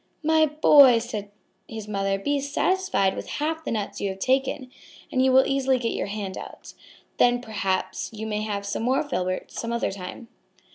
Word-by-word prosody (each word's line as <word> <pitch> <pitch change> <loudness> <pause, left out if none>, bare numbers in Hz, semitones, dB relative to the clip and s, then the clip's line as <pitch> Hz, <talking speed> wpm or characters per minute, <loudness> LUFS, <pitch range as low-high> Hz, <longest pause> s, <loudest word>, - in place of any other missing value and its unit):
"My 315 0 +4
boy," 285 -4 +7
said 220 -3 -4 0.4
his 220 -2 -7
mother, 195 -1 -1
"be 285 +9 -1
satisfied 285 - 0
with - - -6
half 315 +2 -2
the - - -4
nuts 210 -3 -3
you 200 - 0
have 190 - -5
taken 260 +3 0 0.4
and 255 - +2
you 265 - +4
will 260 +1 +6
easily 270 -1 +1
get 235 -2 -2
your - - -3
hand 200 -2 -5
out. - - -11 0.4
Then 245 0 +4
perhaps 200 -5 -2
you 220 0 -6
may 210 -1 -2
have 205 -2 -3
some 200 - -3
more 255 +5 +1
filberts 185 -8 -3
some 230 - -4
other 235 -3 -1
time." 195 +4 -8
235 Hz, 185 wpm, -25 LUFS, 200-270 Hz, 0.4 s, boy